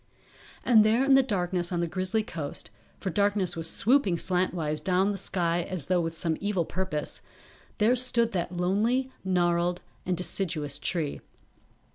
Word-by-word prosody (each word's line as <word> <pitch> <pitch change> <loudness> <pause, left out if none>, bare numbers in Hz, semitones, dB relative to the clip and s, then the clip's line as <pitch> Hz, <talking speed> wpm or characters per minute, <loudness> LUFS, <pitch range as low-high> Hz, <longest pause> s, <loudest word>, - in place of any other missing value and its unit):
And 225 -4 +6
there 225 +4 +3
in 275 - +5
the 270 - +7
darkness 180 -7 -1
on 175 - -1
the 170 - +1
grizzly 185 +5 -1
coast, 145 - -5 0.3
for 190 - -3
darkness 200 0 +1
was 165 0 0
swooping 225 -6 +3
slantwise 175 -4 -1
down 190 +1 +2
the - - -3
sky 175 -1 0
as 175 -4 -3
though 180 +1 +2
with 165 0 -3
some 160 -1 0
evil 200 -4 0
purpose, 185 -5 -3 0.6
there 225 +3 +4
stood 235 -2 +1
that 175 -1 -3
lonely, 225 +9 +1
gnarled 175 -1 +1 0.2
and 180 -1 -1
deciduous 160 -6 -2
tree. 155 -1 -2
180 Hz, 155 wpm, -27 LUFS, 170-205 Hz, 0.6 s, the